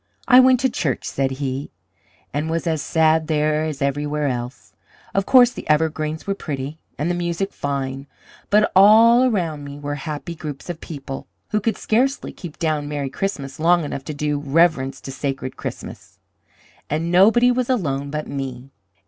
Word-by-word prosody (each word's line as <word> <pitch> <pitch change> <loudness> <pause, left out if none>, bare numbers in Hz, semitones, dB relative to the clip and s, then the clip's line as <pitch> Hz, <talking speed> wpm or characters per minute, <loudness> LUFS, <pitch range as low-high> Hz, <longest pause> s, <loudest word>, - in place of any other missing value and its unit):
"I 250 -1 +8
went 255 -1 +6
to 265 - +3
church," 140 - -2
said 135 -1 -1
he, 135 0 -4 0.6
"and 150 +3 -2
was 165 +1 -2
as 160 -3 0
sad 160 +1 +2
there 155 0 +1
as 150 -3 -3
everywhere 145 +1 -1
else. 125 0 -6 0.4
Of 195 0 0
course, 250 -2 +7
the - - -9
evergreens 155 0 0
were 200 - 0
pretty, 145 -4 -5 0.2
and 150 +4 -1
the 175 - +1
music 175 +2 -2
fine; 135 -1 -3 0.4
but 210 +1 +4
all 225 +5 +7
around 170 - -1
me 140 0 -8
were 145 0 -4
happy 150 +3 -5
groups 155 0 -6
of 165 - -10
people, 135 -3 -7 0.2
who 210 - +1
could 220 0 0
scarcely 260 +5 0
keep 170 -4 -9
down 155 -3 -1
merry 140 -2 -3
Christmas 140 -7 -4
long 170 +1 +4
enough 140 -1 -5
to 155 - -4
do 150 0 -1
reverence 140 -2 +1
to 135 - -7
sacred 135 -1 -4
Christmas. - - -8 0.7
And 165 +3 -1
nobody 225 +7 +5
was 250 0 -1
alone 140 - -1
but 150 +1 -4
me. 135 -1 -6
155 Hz, 170 wpm, -21 LUFS, 140-180 Hz, 0.7 s, I